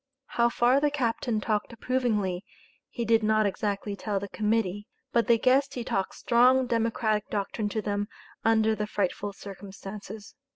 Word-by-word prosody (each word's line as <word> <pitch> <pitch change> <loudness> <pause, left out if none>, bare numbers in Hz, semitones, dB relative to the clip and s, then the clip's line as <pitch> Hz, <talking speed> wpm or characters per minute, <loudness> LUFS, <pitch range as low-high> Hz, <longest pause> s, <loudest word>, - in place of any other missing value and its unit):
How 235 0 +3
far 245 +3 +3
the 295 +1 +2
captain 240 -4 -1
talked 210 +1 -1
approvingly, 220 -6 -1 0.5
he 235 - -3
did 225 0 +4
not 215 0 +3
exactly 200 0 -2
tell 200 -1 -2
the 200 +1 -6
Committee, 210 -2 0 0.2
but 235 -1 +2
they 235 - +5
guessed 265 +4 +3
he 245 - -3
talked 195 -4 -2
strong 255 +2 +4
Democratic 225 -2 0
doctrine 205 +1 -2
to 215 +1 -2
them 205 0 -1 0.4
under 220 -1 +3
the 210 -1 -2
frightful 205 0 -1
circumstances. 200 +1 -9
215 Hz, 155 wpm, -28 LUFS, 205-235 Hz, 0.5 s, they